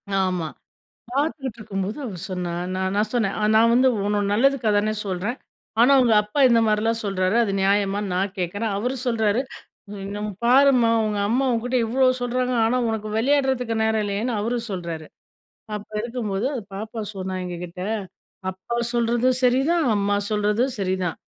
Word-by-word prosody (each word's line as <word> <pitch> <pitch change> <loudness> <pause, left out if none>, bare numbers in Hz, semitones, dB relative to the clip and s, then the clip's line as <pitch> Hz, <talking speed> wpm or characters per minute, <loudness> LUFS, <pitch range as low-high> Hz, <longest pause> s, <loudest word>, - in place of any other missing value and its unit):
ஆமா. 185 -4 0 0.7
பாத்துகிட்டு 275 -4 -2
இருக்கும்போது 205 +3 -4
அவ 210 -7 -5
சொன்னா, 180 -2 -3 0.2
நா 185 - -2
நான் 210 +1 +1
சொன்னேன். 220 -5 0 0.2
நான் 230 +1 +5
வந்து 260 +2 +5 0.2
உன்னோட 205 0 +1
நல்லதுக்காதானே 215 -3 +2
சொல்றேன். 195 +6 -2 0.4
ஆனா 255 +4 +6
உங்க 235 -3 +4
அப்பா 210 +7 -3
இந்த 230 -1 +4
மாரிலாம் 220 +2 +1
சொறாரு, 190 0 0
அது 200 - -2
நியாயமான்னு 200 0 +1
நான் 190 +1 -1
கேக்குறேன். 200 +5 -2
அவரு 250 +6 -1
சொல்றாரு, 220 -1 +1 0.6
"என்ன, 205 +1 -5 0.2
பாரும்மா 255 -2 +5
உங்க 210 -1 -1
அம்மா 255 +4 +2
உன்கிட்ட 245 +2 -1
இவ்வளோ 255 +3 +3
சொல்றாங்க 250 +1 0
ஆனா 250 +3 +1
உனக்கு 215 -1 -3
விளையாடுறதுக்கு 260 -2 +1
நேரம் 220 -1 +1
இல்லயேன்னு" 210 +4 -2
அவரு 235 +3 -1
சொல்றாரு. 170 -4 -5 0.7
அப்ப 210 - -9
இருக்கும்போது 230 -2 -2 0.3
பாப்பா 220 +3 -5
சொன்னா 190 -1 -4
எங்ககிட்ட, 180 0 -6 0.7
"அப்பா 190 +6 -6 0.2
சொல்றதும் 240 +2 +2
சரிதான். 275 +6 +3
அம்மா 205 0 +1
சொல்றதும் 210 +5 +1
சரிதான். 185 -2 -1
220 Hz, 140 wpm, -23 LUFS, 195-245 Hz, 0.7 s, ஆனா